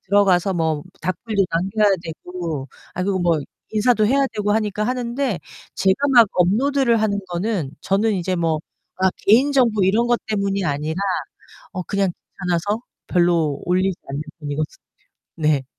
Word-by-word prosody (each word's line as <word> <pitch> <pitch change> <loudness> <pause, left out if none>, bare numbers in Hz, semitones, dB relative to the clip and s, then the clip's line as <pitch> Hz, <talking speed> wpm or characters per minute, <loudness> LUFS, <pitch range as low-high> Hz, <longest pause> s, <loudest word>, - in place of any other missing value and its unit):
들어가서 195 -1 +3
뭐 160 -3 0 0.2
답글도 195 +4 0
남겨야 195 +5 +2
되고 165 -3 -5 0.3
아 185 - -2
그리고 195 0 0
뭐 170 -3 +2 0.3
인사도 215 0 +3
해야 275 +3 +3
되고 210 -1 0
하니까 210 -1 0
하는데 245 -2 -1 0.4
제가 195 +10 +2
막 235 -3 +8
업로드를 235 +6 +2
하는 205 -2 +1
거는 175 -4 -2
저는 210 +3 +1
이제 185 0 -1
뭐 165 -2 +1 0.4
그러니까 190 0 +2
개인 255 +8 +4
정보 235 -6 +3
이런 220 +6 +3
것 240 - +3
때문이 200 -2 -1
아니라 150 +2 -2 0.7
어 185 - -3
그냥 195 0 0
귀찮아서 185 +5 -3 0.3
별로 170 -5 +2
올리지 185 +1 +1
않는 140 +2 -3 0.2
편이거든요. 150 0 -4 0.6
네. 150 -4 +1
195 Hz, 320 characters per minute, -21 LUFS, 170-220 Hz, 0.7 s, 막